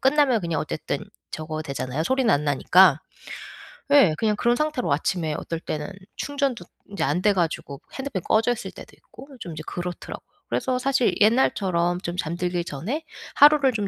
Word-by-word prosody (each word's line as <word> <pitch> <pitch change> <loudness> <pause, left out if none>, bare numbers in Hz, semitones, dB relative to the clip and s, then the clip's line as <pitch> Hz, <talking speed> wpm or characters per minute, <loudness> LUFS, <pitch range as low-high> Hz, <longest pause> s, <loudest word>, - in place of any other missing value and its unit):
끝나면 265 -4 +3
그냥 170 -2 -2
어쨌든 - - -3 0.3
저거 155 0 -5
되잖아요 140 0 -3
소리는 260 +2 +2
안 145 +1 +1
나니까. 155 +3 +5 0.9
예 275 - +6
그냥 215 +2 +1
그런 240 +3 +2
상태로 300 - -1
아침에 160 +1 -1
어떨 165 -1 -4
때는 150 +3 -4 0.3
충전도 275 -9 -2 0.2
인제 200 - -3
안 150 +7 0
돼 210 - +4
가지고 160 -5 -2
핸드폰이 265 -10 -4
꺼져있을 225 +2 +1
때도 - - -12
있고. - - -15
좀 170 -6 -7
이제 155 - -7
그렇더라고요. 175 0 -6 0.2
그래서 255 -1 0
사실 255 -1 +1
옛날처럼 185 -6 +2
좀 175 0 -4
잠들기 175 +1 -2
전에 210 - -4 0.3
하루를 290 -2 +6
좀 205 -3 -2
190 Hz, 370 characters per minute, -24 LUFS, 165-255 Hz, 0.9 s, 예